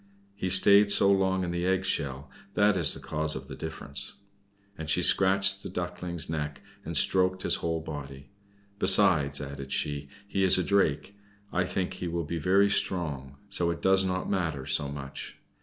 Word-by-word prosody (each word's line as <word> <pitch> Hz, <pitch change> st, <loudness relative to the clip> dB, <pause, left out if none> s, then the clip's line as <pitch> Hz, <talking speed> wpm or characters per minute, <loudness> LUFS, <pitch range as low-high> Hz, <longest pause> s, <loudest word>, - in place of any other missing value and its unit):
He 95 Hz, -2 st, -4 dB
stayed 100 Hz, +2 st, +5 dB
so 100 Hz, -1 st, +4 dB
long 95 Hz, -1 st, +1 dB
in 85 Hz, -, -3 dB
the 85 Hz, 0 st, -3 dB
egg 95 Hz, +1 st, 0 dB
shell, 70 Hz, -5 st, -3 dB, 0.2 s
that 105 Hz, -1 st, +3 dB
is 85 Hz, -5 st, +2 dB
the -, -, -9 dB
cause 75 Hz, 0 st, -3 dB
of -, -, -8 dB
the -, -, -9 dB
difference." 70 Hz, -3 st, -1 dB, 0.6 s
And 80 Hz, -3 st, -7 dB
she -, -, +1 dB
scratched 95 Hz, 0 st, +5 dB
the -, -, -7 dB
Duckling's 90 Hz, -2 st, -4 dB
neck, 75 Hz, -2 st, -4 dB, 0.2 s
and -, -, -3 dB
stroked 95 Hz, 0 st, +2 dB
his -, -, +2 dB
whole 80 Hz, -1 st, -3 dB
body. 70 Hz, -2 st, -9 dB, 0.5 s
"Besides," 90 Hz, -8 st, +4 dB
added 70 Hz, -1 st, -8 dB
she, 70 Hz, 0 st, -3 dB, 0.2 s
"he 100 Hz, -1 st, -2 dB
is 95 Hz, -, +4 dB
a 90 Hz, -, 0 dB
Drake. 100 Hz, -2 st, 0 dB, 0.4 s
I 90 Hz, 0 st, +1 dB
think 90 Hz, 0 st, -3 dB
he 90 Hz, -, -6 dB
will 85 Hz, -1 st, -3 dB
be 85 Hz, +2 st, -4 dB
very 95 Hz, +5 st, +3 dB
strong, 75 Hz, -9 st, -1 dB
so 90 Hz, -4 st, 0 dB
it 85 Hz, -, -5 dB
does 95 Hz, 0 st, +4 dB
not 95 Hz, 0 st, -2 dB
matter 80 Hz, -9 st, -2 dB
so 70 Hz, +1 st, 0 dB
much. 70 Hz, -1 st, -8 dB
85 Hz, 180 wpm, -27 LUFS, 75-95 Hz, 0.6 s, stayed